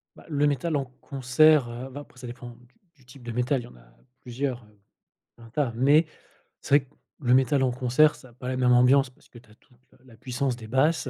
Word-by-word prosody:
Bah, - - -16
le 150 -2 +1
métal 145 +3 0
en 140 - -1 0.2
concert, 140 0 +3
heu, 120 +3 -7
va 135 +2 -8
après 145 - -16
ça 125 - -9
dépend 120 0 -9
du 120 +1 -18 0.3
du 130 -5 -26
type 125 +1 -15
de 120 - -5
métal, 125 +2 0
il - - -13
y - - -10
en - - -15
a - - -21 0.2
plusieurs, 125 0 -4
heu, 105 -1 -25 0.6
un 115 - -13
tas, 130 -1 -1
mais 145 +7 +4 0.6
c'est 145 - +4
vrai 135 - -14
que 135 - -31 0.3
le 125 -2 +2
métal 135 +2 +3
en 130 -1 +2
concert, 130 +5 +3
ça 130 - -16
a - - -21
pas 125 +1 -9
la 130 - -2
même 125 -1 +2
ambiance 130 +2 +4
parce - - -26
que - - -15
tu 115 - -18
as - - -19
toute 125 - -29
le - - -25
la 120 -3 -17
puissance 125 +2 -3
des 115 -2 -11
basses, 135 +5 +1
130 Hz, 255 wpm, -26 LUFS, 120-140 Hz, 0.6 s, mais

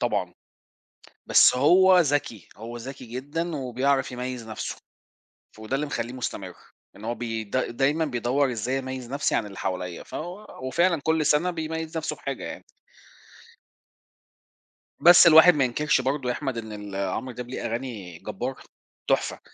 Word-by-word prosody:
طبعًا، - - -1 0.9
بس - - +6
هو 180 +7 +6
ذكي، 145 - 0
هو 115 +2 -7
ذكي 130 +2 -8
جدًا 145 +8 -4
وبيعرف 135 0 0
يميّز 125 -2 -5
نفسُه، 110 - -4 0.8
وده 110 +4 -4
اللي 150 +2 -2
مخلّيه 120 -4 -3
مستمرّ، 100 -7 -5 0.4
إن 105 - -12
هو 120 +1 -2
ب 120 +1 -6 0.3
د 130 -1 -1
دايمًا 145 +5 +2
بيدوّر 130 0 0
إزاي 125 +4 -2
أميّز 130 -2 -6
نَفسي 145 - 0
عن 105 - 0
اللي 100 -2 -10
حواليّا، 90 -2 -4
فهو 180 +6 -7 0.2
وفعلًا 170 +2 +2
كل 160 -1 +1
سنة 150 +5 +3
بيميّز 160 -1 -4
نفسُه 160 - -3
بحاجة - - -5
يعني. - - -7 2.4
بس 175 0 +8
الواحد 165 +2 +9
ما 140 -3 +2
ينكرش 130 +3 +1
برضه 135 0 -1
يا 125 - 0
أحمد 135 -5 -3
إن 110 -1 -7
ال 105 -2 -7
عمرو 130 +6 -4
دياب 125 0 -7
ليه 130 - -5
أغاني 110 -8 -5
جبارة، - - -5 0.5
تحفة. - - 0
130 Hz, 150 wpm, -25 LUFS, 120-155 Hz, 2.4 s, الواحد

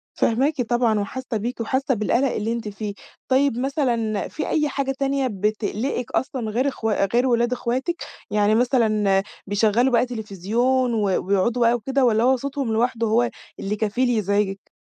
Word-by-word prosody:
فاهماكِ 270 +5 +1
طبعًا 240 -2 +1
وحاسّة 235 +3 -4
بيكِ 235 +3 -4
وحاسّة 260 +4 0
بالقلَق 240 +4 +1
اللي 220 +2 -2
أنتِ 235 -2 -4
فيه. 205 0 -5 0.3
طيب 265 -2 +2
مثلًا 245 -6 -1
في 310 - -4
أي 300 -2 +1
حاجة 275 -1 -1
تانية 275 -1 +1
بتقلقِك 215 +4 -2
أصلًا 260 -4 -2
غير 245 +6 0
أخوا 225 -7 0
غير 245 +2 +3
ولاد 240 0 +2
أخواتِك؟ 255 +7 -1 0.4
يعني 210 +1 +3
مثلًا 215 -5 +2 0.2
بيشغّلوا 220 +5 +2
بقى 240 - +4
تليفزيون 235 +3 0
و 220 - 0 0.2
ويقعُدوا 200 +5 +1
بقى 235 0 +5
وكده 260 +3 +1
والّا 225 -1 +3
هو 260 +2 +4
صوتهم 275 -2 -3
لوحده 230 0 +1
هو 235 +2 +2 0.3
اللي 200 +2 -2
كفيل 220 +4 0
يزعجِك؟ 200 -3 0
235 Hz, 160 wpm, -23 LUFS, 215-260 Hz, 0.4 s, بقى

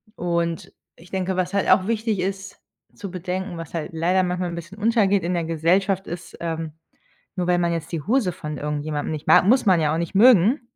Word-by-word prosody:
Und 170 -1 -2 0.2
ich 170 +2 -17
denke, 190 -1 -2
was 185 +1 -1
halt 200 - +1
auch 190 +1 +4
wichtig 220 -2 -1
ist 195 +1 -4 0.3
zu 205 -4 -7
bedenken, 185 0 -4
was 165 -1 -8
halt 160 -2 -3
leider 175 +4 +2
manchmal 180 0 -2
'n 170 - -5
bisschen 170 +4 -9
untergeht 205 -4 +2
in 175 - -1
der 170 -2 -1
Gesellschaft 180 +4 +1
ist, 175 +1 -8
ähm: 160 -2 -4 0.6
Nur 180 -1 -2
weil 180 - +3
man 170 -1 +1
jetzt 165 0 -5
die 165 - -3
Hose 225 -5 +1
von 150 -1 -6
irgendjemandem 150 +1 -3
nicht 155 -1 -6
mag- - - +6
muss 250 +5 +4
man 185 -5 +4
ja 150 -1 +1
auch - - 0
nicht 170 - -4
mögen- 230 - +5
180 Hz, 210 wpm, -23 LUFS, 165-195 Hz, 0.6 s, mag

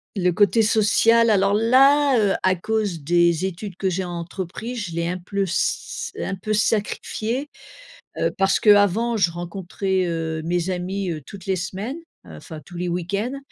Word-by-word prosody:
Le 180 -2 +2
côté 205 +3 +3
social 225 +2 +4
alors 200 -1 +3
là, 270 +5 +4
heu, 200 -2 +2
à 185 0 +3
cause 205 -2 -2
des 170 +2 +2
études 190 +1 -5
que 190 +1 -1
j'ai 185 +1 -2
entrepris, 180 +6 -6
je 200 -8 -5
l'ai 170 0 -1
un 180 - -2
pleut 200 +3 -2
s 185 -1 -2
un - - -3
peu 215 +3 -3
sacrifié. 220 +5 -1 0.7
Heu, - - +1
parce 195 0 +2
qu'avant 210 +3 +4
je 185 -5 +2
rencontrais, 185 +2 -2
heu, 165 -2 -3
mes 175 +2 -1
amis, 185 +1 -3
heu, 155 - -4
toutes 200 -4 -11
les 190 -1 0
semaines. 195 - -5 0.3
Enfin 85 - -10
tous 175 - -12
les 180 +1 -2
week-ends, 200 +9 -2
190 Hz, 165 wpm, -22 LUFS, 175-215 Hz, 0.7 s, social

